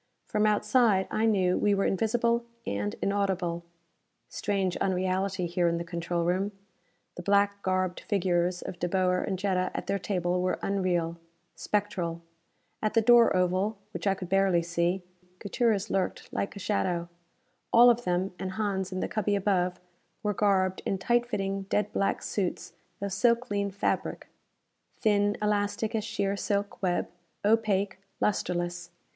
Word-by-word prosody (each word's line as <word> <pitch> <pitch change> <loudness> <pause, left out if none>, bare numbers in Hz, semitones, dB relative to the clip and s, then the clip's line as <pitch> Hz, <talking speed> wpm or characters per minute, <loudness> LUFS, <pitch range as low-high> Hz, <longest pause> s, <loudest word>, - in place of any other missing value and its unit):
From 210 0 +1
outside, 210 -1 +3
I 220 +1 +2
knew, 185 -4 +2
we 205 -1 +3
were 195 - +1
invisible 235 +4 +1 0.2
and 105 +1 -2
inaudible. 190 -4 0 0.7
Strange 195 -3 -1
unreality, 185 0 0
here 175 0 +1
in 170 0 +1
the 170 - -3
control 170 0 -2
room! 185 +4 0 0.6
The - - -4
black 200 +1 +2
garbed 185 -1 0
figures 180 -2 0
of 175 - -7
De 175 - -1
Boer 180 0 +2
and 190 - -2
Jetta 185 -1 0
at - - -3
their 200 - -1
table 180 -2 -1
were 185 - 0
unreal, 175 -4 0 0.3
spectral. 180 -5 -2 0.6
At 215 +1 -1
the 225 - +4
door 240 -1 +6
oval, 185 +4 +1
which - - -4
I 195 - +3
could 185 - -7
barely 190 -2 +3
see, 170 +2 0 0.3
Gutierrez 215 +1 0
lurked 190 -1 -2
like 200 - -2
a - - -7
shadow. 180 -4 -1 0.6
All 240 +1 +8
of 240 0 -1
them, 180 0 0
and 185 0 -4
Hans 195 -3 -2
in 185 0 -3
the - - -1
cubby 205 -1 0
above, 185 -2 +1 0.4
were 210 -1 +1
garbed 190 -2 +2
in 195 - -1
tight 240 +5 +1
fitting 195 -3 -2
dead 210 0 0
black 195 - 0
suits 185 -4 -3 0.3
of 200 0 -2
silklene 220 -2 +1
fabric. 195 - -2 0.7
Thin, 205 -1 +2
elastic 210 +1 0
as 220 -2 0
sheer 200 -2 -1
silk 200 0 -2
web, 180 -2 0 0.4
opaque, 205 -3 +2 0.2
lustreless. 175 -3 -1
195 Hz, 150 wpm, -28 LUFS, 180-205 Hz, 0.7 s, All